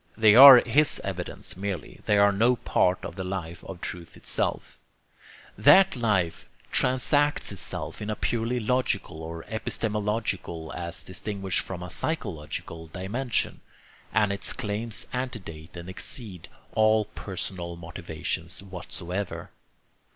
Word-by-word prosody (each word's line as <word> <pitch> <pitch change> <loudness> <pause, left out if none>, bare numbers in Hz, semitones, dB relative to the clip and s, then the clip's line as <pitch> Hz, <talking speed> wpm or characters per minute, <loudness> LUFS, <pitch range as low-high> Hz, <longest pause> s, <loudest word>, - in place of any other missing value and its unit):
They 110 -2 +6
are 130 +1 +11
his 145 +6 +3
evidence 95 -2 -5
merely, 95 -1 -5
they 105 - +4
are 100 0 +6
no 115 +5 +3
part 90 -5 +1
of - - -6
the 95 - -4
life 90 -3 -5
of 90 -2 -8
truth 85 -2 -7
itself. - - -2 0.8
That 145 - +6
life 100 -9 0 0.2
transacts 145 +3 +2
itself - - -4
in 105 - -4
a 105 - -1
purely 115 +5 -1
logical 110 -8 -1
or 80 0 -7
epistemological, 105 -6 -2
as 85 0 -5
distinguished 95 -1 -2
from 90 -2 -5
a 90 - -7
psychological, 80 - -4
dimension, 105 +9 -2 0.5
and 105 -2 +2
its 100 - 0
claims 105 +2 -4
antedate 95 -11 -5
and 85 +1 -8
exceed 95 -1 -6 0.2
all 110 -1 +4
personal 90 -4 -4
motivations 85 +1 -6
whatsoever. 90 0 -5
100 Hz, 120 wpm, -27 LUFS, 90-115 Hz, 0.8 s, are